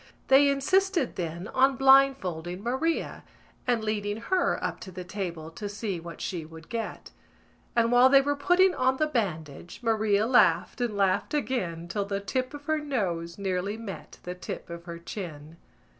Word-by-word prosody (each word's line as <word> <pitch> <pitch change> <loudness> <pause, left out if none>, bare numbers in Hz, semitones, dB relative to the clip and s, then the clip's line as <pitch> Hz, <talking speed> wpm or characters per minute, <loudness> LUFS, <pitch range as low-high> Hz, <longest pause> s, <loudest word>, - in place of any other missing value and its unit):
_ - - -24 0.3
They 275 +2 +7
insisted 345 +2 +1
then 170 +1 -4
on 265 +1 +3
blindfolding 220 -11 +3
Maria 265 +8 -1 0.4
and 240 -3 +1
leading 210 -1 -2
her 365 +11 +1
up - - -2
to 190 - -9
the 180 0 -7
table 170 -4 -5
to 205 +5 -6
see 205 -3 -3
what 170 -1 -9
she 175 -4 -3
would 160 +1 -13
get; 230 -1 -5 0.6
and, 230 0 +3
while 245 +1 +7
they 275 0 +7
were 285 +1 0
putting 360 +5 +4
on 260 +1 +1
the 310 - +2
bandage, 175 - -3
Maria 215 -2 +2
laughed 230 -5 +3
and 230 -4 -1
laughed 195 +8 +1
again 185 - -2
till 200 +3 -2
the 200 0 -2
tip 255 +7 -3
of 290 0 -10
her 315 -1 +1
nose 180 - -2
nearly 195 +1 -2
met 225 -4 -8
the 180 - -5
tip 180 -1 -7
of 170 0 -8
her 170 -2 -6
chin. 165 -3 -8
210 Hz, 175 wpm, -27 LUFS, 175-265 Hz, 0.6 s, They